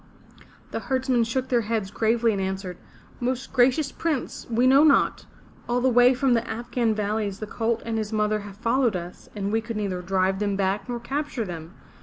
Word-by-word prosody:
'* - - -24
The - - -2
herdsmen 260 -3 +1
shook 255 +3 -2
their 240 -2 +3
heads 215 -3 -2
gravely 225 +2 +2
and 200 -2 -2
answered, 190 -1 -4 0.4
"Most 255 +1 -3
gracious 265 +3 +3
Prince, 310 -6 -3
we 235 +2 +2
know 270 +3 +6
not. 290 -3 +3 0.4
All 245 +1 +2
the 260 +1 +3
way 245 +1 +5
from 260 0 +2
the 235 0 0
Afghan 230 0 -1
valleys 210 -1 -1
the 215 - -4
colt 230 +2 -2
and 225 -1 -1
his 215 0 -4
mother 215 0 +1
have 200 -1 -10
followed 235 0 +1
us, 175 0 -7
and 200 -1 -2
we 225 +1 +1
could 230 -1 -5
neither 195 -4 -2
drive 190 +1 0
them 205 -1 0
back 195 +3 -1
nor 240 -1 -2
capture 270 -1 -3
them. 170 -1 -8
225 Hz, 200 wpm, -25 LUFS, 200-245 Hz, 0.4 s, know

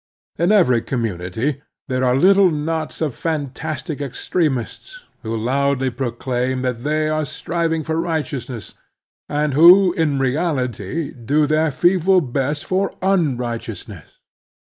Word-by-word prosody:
In 170 +4 +3
every 145 - +4
community 115 - -3 0.3
there 130 -2 -1
are 125 0 +3
little 190 +5 +5
knots 155 +1 -3
of 150 -5 0
fantastic 150 0 -4
extremists 150 - -3 0.2
who 115 -1 -3
loudly 135 +3 0
proclaim 125 +1 -2
that 125 -2 -2
they 155 +1 0
are 155 0 0
striving 165 +2 -2
for 160 +2 -1
righteousness, 140 - -4 0.6
and 150 -1 0
who, 175 +5 +7
in 155 -5 0
reality, 135 - -1
do 140 +5 0
their 155 +2 +2
feeble 180 +4 +3
best 140 0 -2
for 190 +1 -1
un 175 -9 +2
righteousness. 115 - -7
145 Hz, 120 wpm, -20 LUFS, 125-165 Hz, 0.6 s, who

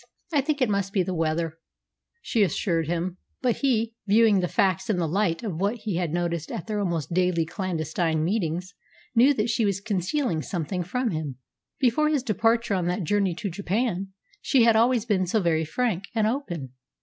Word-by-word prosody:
I 290 - +4
think 285 -1 0
it - - +3
must 200 -1 -1
be 190 - +2
the 185 - -3
weather," 165 0 -1 0.6
she 230 - +1
assured 170 -4 +1
him. 175 +2 -2 0.3
But 245 -2 +2
he, 230 -5 +1
viewing 215 -1 +5
the 180 - 0
facts 190 +4 +1
in 210 - +2
the 170 -2 0
light 175 +1 0
of 185 -6 -4
what 200 +4 +1
he 210 -6 -3
had 175 -3 -1
noticed 170 -1 -2
at - - -5
their 215 -2 -2
almost 170 -5 -2
daily 180 -2 +2
clandestine 165 -3 -1
meetings, 180 0 -1 0.4
knew 250 +4 +6
that 220 +1 0
she 235 - +1
was 200 -2 +1
concealing 200 - -1
something 180 +2 -3
from 235 +8 -1
him. 155 -5 -3 0.4
Before 280 +3 +3
his 295 -5 +1
departure 230 -1 +1
on 180 -3 0
that 180 +2 -1
journey 195 0 +1
to 200 +2 -4
Japan 195 +1 -1 0.3
she 260 -4 +3
had 230 -1 +5
always 235 0 +3
been 190 -5 +1
so 220 +5 +2
very 165 -4 +1
frank 200 +1 -1
and 220 -2 +2
open. 200 - -2
195 Hz, 190 wpm, -25 LUFS, 170-225 Hz, 0.6 s, knew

